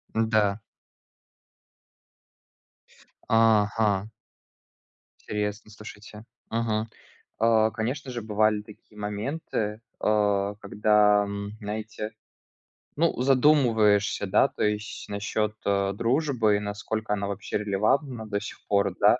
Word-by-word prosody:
Н-да. 110 -2 +2 2.7
Ага. 105 -2 +3 1.1
Интересно, 105 0 -4
слушайте. 105 0 -11 0.2
Мгм. 110 -1 -1 0.5
А, 110 -1 +4
конечно 130 +4 -3
же, 120 -1 -4
бывали 105 0 +1
такие 105 0 -17
моменты, 105 +1 -3 0.2
а, 105 -1 +1
когда, 105 0 +3
м, 100 0 -5
знаете, 110 +1 -5 0.8
ну, 165 +2 +2
задумываешься, 125 -7 +3
да, - - +4
то - - -4
есть 105 0 -2
насчет, 105 +1 -2
э, 100 -1 +1
дружбы, 120 -2 +1
и - - -2
насколько 105 +1 -3
она 100 -1 -2
вообще 100 0 -3
релевантна 110 +5 0
до 100 0 -2
сих 110 - -8
пор, 100 -2 +2
да. - - +5
105 Hz, 100 wpm, -26 LUFS, 105-115 Hz, 2.7 s, да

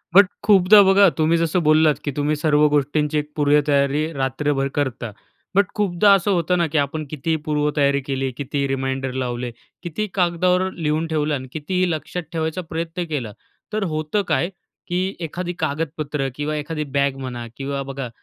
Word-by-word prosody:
But 200 -1 +8 0.2
खूपदा 205 0 +7
बघा 195 0 +6
तुम्ही 160 +2 +3
जसं 165 +2 +1
बोललात 155 -1 +4
की 145 - -1
तुम्ही 145 +2 0
सर्व 150 0 +3
गोष्टींची 150 +1 +1
एक 150 0 -3
पूर्वतयारी 145 +1 +2
रात्रभर 135 +1 -1
करता. 125 -5 -2 0.4
बट 200 -1 +4
खूपदा 200 -1 +3
असं 195 +2 0
होतं 180 0 +1
ना 170 -1 +2
की - - +2
आपण 145 +2 -1
कितीही 155 +2 -1
पूर्वतयारी 150 -2 +1
केली, 135 -1 -2
कितीही 140 0 -2
रिमाइंडर 135 -1 -2
लावले, 120 -1 -3 0.3
कितीही 210 +5 -3
कागदावर 180 +1 +2
लिहून 160 0 -1
ठेवलं 155 -2 0
अन् 130 -1 -6
कितीही 180 +4 -1
लक्षात 165 +3 -4
ठेवायचा 160 +2 -2
प्रयत्न 165 +2 -3
केला, 125 -8 -3 0.4
तर 215 -1 0
होतं 155 +7 0
काय 170 - +1 0.4
की 185 +2 -1
एखादी 175 +2 -4
कागदपत्र 150 -2 -2
किंवा 150 +1 -2
एखादी 150 +1 -3
बॅग 140 -1 +2
म्हणा 125 -2 -5
किंवा 140 0 -3
बघा 135 -3 -5
150 Hz, 160 wpm, -21 LUFS, 140-170 Hz, 0.4 s, बट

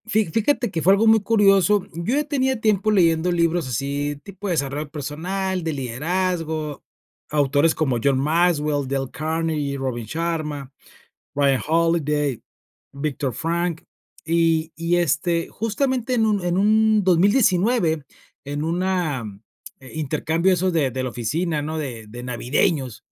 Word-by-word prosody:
Fi 220 0 +2
fíjate 225 - 0
que 165 - -2
fue 190 +5 +5
algo 205 +3 +3
muy 220 0 +6
curioso. 200 -2 +3
Yo 170 - -1
ya 295 - +2
tenía 265 -4 0
tiempo 215 -1 +2
leyendo 175 -4 +3
libros 170 -2 +1
así, 140 +4 -2
tipo 200 0 -8
de 180 - 0
desarrollo 145 0 -2
personal, 175 +6 -3
de 160 -1 -2
liderazgo. 155 +3 -2 0.5
Autores 145 +2 +2
como 135 -6 0
John 140 -2 +3
Maxwell, 150 -2 +1
Dale 135 -1 -2
Carnegie, 155 -3 -2
Robin 130 -4 -3
Sharma, 150 -1 -3 0.6
Ryan 140 -2 +2
Holiday, 150 -5 +1 0.5
Viktor 140 -3 -3
Frankl. 170 +3 -2 0.4
Y 165 -1 +1
y, 170 +1 0
este, 170 0 0
justamente 250 +3 -1
en 225 -2 +2
un 205 -3 +1
en 175 0 0
un 215 +1 +3
2019, 185 - +3 0.4
en 145 +1 -4
una 170 -6 -1 0.6
eh, 130 - -13
intercambio 160 +4 0
de - - +5
esos 185 +1 0
de 150 -5 +1
de 130 +1 -2
la 130 - -2
oficina, 150 +8 -2
¿no? 155 +2 -4
De 120 -7 -5
de 120 +3 -9
navideños, 125 +1 -1
165 Hz, 140 wpm, -22 LUFS, 145-185 Hz, 0.6 s, muy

